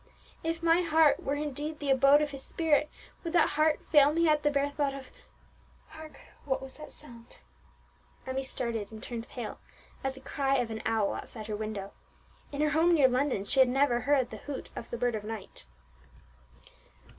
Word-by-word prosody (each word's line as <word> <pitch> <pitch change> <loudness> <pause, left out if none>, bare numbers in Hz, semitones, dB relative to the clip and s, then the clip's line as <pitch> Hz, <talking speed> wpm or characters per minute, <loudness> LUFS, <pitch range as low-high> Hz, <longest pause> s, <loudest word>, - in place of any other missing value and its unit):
If 330 +1 -2
my 335 +1 +4
heart 320 -3 +4
were 280 - -1
indeed 295 +1 -4
the 285 -2 -1
abode 275 +3 +6
of 295 - -3
His 275 -1 -5
Spirit, 305 0 +1 0.3
would 335 -1 -4
that 340 -3 +4
heart 305 +1 +2
fail 290 -2 +7
me 335 +2 +2
at 300 -1 +3
the 295 - +2
bare 285 0 0
thought 285 -1 -1
of 265 -1 -10 0.8
hark! 315 -1 -11 0.2
what 265 -2 -1
was 265 0 -10
that 305 - -10
sound?" 235 -5 -13 0.9
Emmie 260 +1 -2
started 235 -5 -4
and 220 -1 -9
turned 235 -1 -6
pale 240 -4 -6 0.4
at 270 0 -2
the - - -11
cry 275 0 -1
of 245 -4 0
an 220 - -5
owl 220 -3 +1
outside 220 -2 -7
her 215 -1 -3
window; 210 -2 -5 0.6
in 285 0 -3
her 300 -1 +2
home 330 +3 +4
near 280 -4 +6
London 255 -5 0
she 270 - 0
had 260 -1 +7
never 265 -1 +2
heard 270 -2 +1
the - - -6
hoot 285 -2 -7
of 230 - -7
the 235 - -4
bird 245 0 0
of 215 -1 -4
night. 210 - -8
275 Hz, 190 wpm, -29 LUFS, 240-300 Hz, 0.9 s, fail